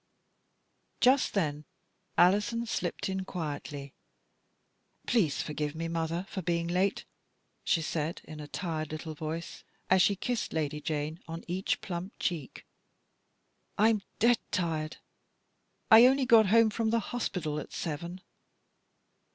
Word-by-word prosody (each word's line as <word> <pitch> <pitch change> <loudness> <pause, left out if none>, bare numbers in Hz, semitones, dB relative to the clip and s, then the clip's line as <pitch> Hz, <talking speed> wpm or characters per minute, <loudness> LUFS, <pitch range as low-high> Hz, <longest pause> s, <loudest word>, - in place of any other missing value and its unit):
Just 260 -1 +4
then 150 -6 0 0.5
Alison 210 +6 +3
slipped 225 - -2
in 190 0 -2
quietly. 145 -5 -5 0.6
" - - -43
Please 175 - +2
forgive 150 0 -3
me, 165 +1 -3
mother, 165 +2 -2
for 190 - -4
being 170 -1 0
late," 185 +3 0 0.6
she 165 - +2
said, 160 +1 -2
in 155 0 -10
a 150 - -7
tired 155 -2 -3
little 155 0 -5
voice, 160 +2 -5 0.3
as 190 0 +6
she 200 - +4
kissed 240 +4 -2
Lady 150 -1 -1
Jane 155 +1 -2
on 165 +1 -6
each 185 +2 -1
plump 180 +2 -5
cheek. 160 -7 -3 0.6
" - - -46 0.3
I'm 215 0 +4 0.2
dead 235 +1 +4
tired. 160 -4 -2 0.9
I 225 +3 +10
only 265 0 +3
got 225 -4 +6
home 225 +2 +5
from 225 +1 0
the 230 +1 +2
hospital 175 -10 -2
at - - -8
seven." 170 +3 -4
170 Hz, 135 wpm, -30 LUFS, 155-205 Hz, 0.9 s, I